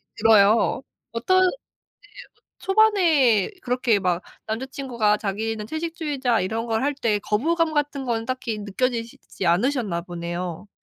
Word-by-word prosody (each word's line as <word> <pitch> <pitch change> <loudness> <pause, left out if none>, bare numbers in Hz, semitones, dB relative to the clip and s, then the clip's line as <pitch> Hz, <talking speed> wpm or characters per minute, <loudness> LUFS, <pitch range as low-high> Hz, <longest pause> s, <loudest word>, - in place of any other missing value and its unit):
들어요. 220 +3 +4 0.3
어떤 370 +12 +2
네 370 - +5
어 - - -5 1.0
초반에 355 - +4
그렇게 250 -3 +1
막 180 -2 0 0.2
남자 225 +5 -3
친구가 240 -6 0
자기는 215 +1 -3
채식주의자 310 - -1
이런 225 +5 -2
걸 225 +1 -1
할 285 0 0
때 225 -6 0
거부감 315 - 0
같은 290 -2 -1
거는 230 -2 -1
딱히 240 -3 -3
느껴지시지 230 -1 -3
않으셨나 195 -1 +1
보네요. 175 +1 -5
230 Hz, 295 characters per minute, -23 LUFS, 210-280 Hz, 1.0 s, 네